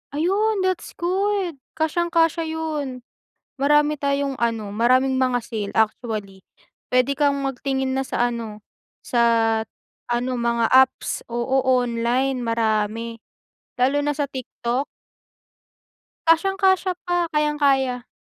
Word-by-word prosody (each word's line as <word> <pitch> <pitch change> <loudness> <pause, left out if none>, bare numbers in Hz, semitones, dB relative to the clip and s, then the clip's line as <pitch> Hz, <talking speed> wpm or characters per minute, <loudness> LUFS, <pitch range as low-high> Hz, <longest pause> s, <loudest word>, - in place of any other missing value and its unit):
Ayun 395 +5 +1
that's 370 -1 -2
good, 375 -3 -1 0.2
kasyang-kasya 330 0 +1
yun. 300 -6 -4 0.6
Marami 295 +1 +4
tayong 280 -1 -1
ano, 220 -3 -1
maraming 255 +3 +3
mga 255 -1 +2
sale 210 -3 -4
actually. 215 -3 -1 0.5
Pwede 255 +2 +2
kang 280 -1 +1
magtingin 265 0 -2
na 265 - 0
sa 240 -2 0
ano, 215 -3 -7 0.4
sa, 240 -1 +1 0.9
ano 240 +2 0
mga 235 -1 +1
apps, 260 0 +3
oo, 250 +3 0
online 250 +1 +1
marami. 230 0 -1 0.6
Lalo 270 +4 +2
na 295 0 -1
sa 290 - 0
TikTok. 260 -1 -3 1.4
Kasyang-kasya 380 +2 +3
pa, 350 -1 +1
kayang-kaya. 275 -5 +1
265 Hz, 105 wpm, -22 LUFS, 235-300 Hz, 1.4 s, Marami